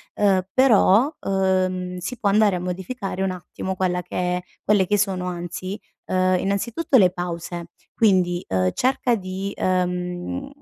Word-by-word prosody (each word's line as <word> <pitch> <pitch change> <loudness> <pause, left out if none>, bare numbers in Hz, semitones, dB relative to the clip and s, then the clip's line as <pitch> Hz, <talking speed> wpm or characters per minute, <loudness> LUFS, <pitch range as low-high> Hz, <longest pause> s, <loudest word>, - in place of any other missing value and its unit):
Uhm, 195 -2 +3
però, 255 +1 +5
uhm, 185 -1 0
si 180 +8 -5
può 205 - +1
andare 205 -1 +4
a - - -2
modificare 190 +3 -4
un 190 -1 0
attimo 185 +1 -5
quella 180 -1 0
che 180 - -10 0.2
è 180 - -5 0.2
quelle 205 -3 +3
che 205 +2 +2
sono, 190 -2 0
anzi, 180 +2 -5 0.3
uhm, - - -3
anzi, 185 0 +2
innanzitutto, 225 +10 -1
le 190 -6 +6
pause, 175 -1 -5 0.3
quindi, 185 -5 +2
uhm, 95 -1 +1
cerca 255 - +1
di, 190 +1 -5
uhm, 180 +7 -2
185 Hz, 155 wpm, -23 LUFS, 180-200 Hz, 0.3 s, le